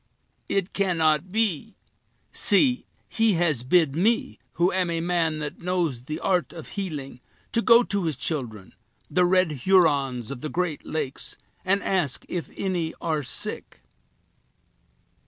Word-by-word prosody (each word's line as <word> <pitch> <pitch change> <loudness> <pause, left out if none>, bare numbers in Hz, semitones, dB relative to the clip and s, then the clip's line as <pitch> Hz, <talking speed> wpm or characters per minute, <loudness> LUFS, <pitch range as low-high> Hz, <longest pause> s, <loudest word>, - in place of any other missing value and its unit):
"It 195 -1 -1
cannot 170 -3 +1
be. 220 -1 -1 0.6
See; 245 +4 +3 0.2
he 225 -2 +2
has 165 -7 +1
bid 145 +2 +2
me, 220 +8 +1
who 175 +2 +2
am 185 -2 0
a 165 -1 -1
man 165 -2 0
that 150 -1 -6
knows 170 -9 -1
the 155 +3 -4
art 180 -8 0
of 165 -3 -9
healing, 150 - -5 0.3
to 230 - +2
go 235 +1 +6
to 200 -5 -1
his 155 -5 -1
children, 120 - -2 0.4
the 180 +4 +3
red 185 -2 +3
Hurons 140 - +2
of 130 -3 -7
the 155 - -4
great 175 -3 -2
lakes, 150 -3 -3 0.3
and 195 +1 +2
ask 175 -9 -1
if 175 -2 -4
any 175 -4 -2
are 155 -2 -1
sick!" 120 - -2
170 Hz, 140 wpm, -25 LUFS, 150-185 Hz, 0.6 s, go